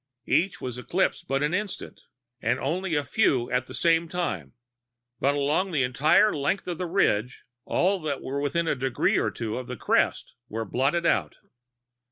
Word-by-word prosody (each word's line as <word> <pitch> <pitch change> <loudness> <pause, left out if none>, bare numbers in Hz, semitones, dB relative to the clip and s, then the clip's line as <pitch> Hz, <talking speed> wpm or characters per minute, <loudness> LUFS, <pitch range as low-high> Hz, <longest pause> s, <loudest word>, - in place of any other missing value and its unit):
Each 180 +3 +1
was 125 -1 -5
eclipsed 180 +9 -1
but 135 +1 0
an 150 +3 0
instant, 205 +1 -4 0.4
and 120 +3 +1
only 170 +5 -1
a 145 - +1
few 130 - +1
at 125 +1 0
the - - -9
same 165 0 +3
time, 95 - -3 0.7
but 140 +1 +2
along 150 +7 +1
the 150 -7 +1
entire 145 +11 +4
length 150 +7 -1
of 175 -1 -4
the 180 - -2
ridge 125 - +1 0.2
all 190 +2 +1
that 150 -4 -3
were 140 +2 -3
within 165 +4 0
a - - +2
degree 130 -2 +1
or - - +1
two 115 0 -4
of 125 - -8
the 125 - -6
crest - - +1 0.2
were 110 +1 -3
blotted 140 - 0
out. 85 - +1
145 Hz, 180 wpm, -26 LUFS, 125-175 Hz, 0.7 s, entire